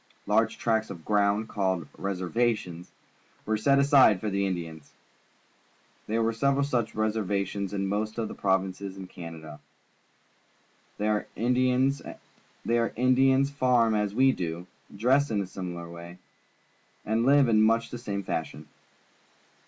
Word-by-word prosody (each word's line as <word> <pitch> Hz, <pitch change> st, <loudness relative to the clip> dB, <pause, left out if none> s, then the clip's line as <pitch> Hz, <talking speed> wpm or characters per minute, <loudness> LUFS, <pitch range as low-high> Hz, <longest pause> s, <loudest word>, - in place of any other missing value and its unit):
Large -, -, +1 dB
tracts 110 Hz, -1 st, 0 dB
of 80 Hz, -3 st, -9 dB
ground, 105 Hz, +1 st, +1 dB
called 95 Hz, -6 st, -1 dB
"reservations," 95 Hz, -2 st, -2 dB, 0.6 s
were 110 Hz, -, 0 dB
set 140 Hz, +6 st, +3 dB
aside 140 Hz, -8 st, +5 dB
for 105 Hz, +2 st, -3 dB
the 100 Hz, 0 st, 0 dB
Indians. 80 Hz, -5 st, -6 dB, 1.1 s
There 115 Hz, +1 st, 0 dB
are 115 Hz, -, 0 dB
several 140 Hz, +4 st, +1 dB
such 120 Hz, -5 st, -1 dB
reservations 100 Hz, -2 st, -1 dB
in 100 Hz, -1 st, -2 dB
most 105 Hz, +3 st, -2 dB
of 115 Hz, -2 st, -2 dB
the -, -, -7 dB
provinces 95 Hz, 0 st, -1 dB
of 95 Hz, -1 st, -8 dB
Canada. 80 Hz, -3 st, -10 dB, 1.4 s
There 105 Hz, 0 st, 0 dB
the 125 Hz, -1 st, -1 dB
Indians 130 Hz, +2 st, +3 dB
farm 125 Hz, -5 st, +2 dB
as 105 Hz, -1 st, -1 dB
we 135 Hz, +2 st, +5 dB
do, 85 Hz, -4 st, -4 dB, 0.3 s
dress 135 Hz, +6 st, +3 dB
in 110 Hz, -3 st, 0 dB
a 100 Hz, -, -1 dB
similar 90 Hz, -2 st, -7 dB
way, 85 Hz, +1 st, -10 dB, 0.9 s
and 110 Hz, +2 st, +1 dB
live 140 Hz, +1 st, +5 dB
in 110 Hz, -2 st, +4 dB
much 115 Hz, +1 st, +2 dB
the 120 Hz, -, -6 dB
same 100 Hz, -4 st, -4 dB
fiishion. 80 Hz, -3 st, -4 dB
105 Hz, 130 wpm, -27 LUFS, 95-120 Hz, 1.4 s, aside